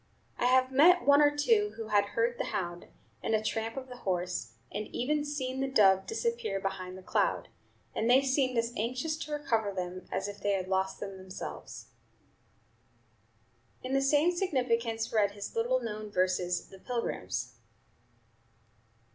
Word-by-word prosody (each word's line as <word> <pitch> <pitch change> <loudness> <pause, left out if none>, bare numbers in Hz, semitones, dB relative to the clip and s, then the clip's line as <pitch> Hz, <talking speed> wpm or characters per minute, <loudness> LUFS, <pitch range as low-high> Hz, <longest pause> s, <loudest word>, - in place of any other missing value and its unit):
I - - +1
have 255 +1 +4
met 340 +7 +6
one 285 +1 +7
or 295 - +7
two 420 +6 +3
who 225 -1 -6
had 205 -1 +4
heard 235 +1 +1
the - - 0
hound, 175 -2 -4 0.3
and 225 - +1
the 215 - 0
tramp 225 +3 -2
of 260 -1 -5
the 250 -1 -9
horse, 180 - -2 0.2
and 210 +1 -4
even 295 +4 -1
seen 265 -3 -3
the 270 - 0
dove 195 -7 +4
disappear 465 - -1
behind 190 -1 -4
the 190 - -12
cloud; - - 0 0.4
and 225 - 0
they 260 +2 +6
seemed 260 -2 +1
as 230 +1 0
anxious 255 +8 -1
to 305 -1 -6
recover 230 -8 0
them 185 -1 -5
as 190 +1 -1
if 205 0 -7
they 205 0 +1
had 185 -1 -1
lost 190 0 0
them 195 -1 -6
themselves." 185 - -8 1.9
In 255 +1 -3
the 270 - +3
same 290 +5 +4
significance 245 - 0
read 205 -2 +3
his 205 0 -7
little 240 +3 +2
known 215 -3 -5
verses, 180 -2 0
"The 195 - -13
Pilgrims." 230 - -3
230 Hz, 165 wpm, -30 LUFS, 195-270 Hz, 1.9 s, one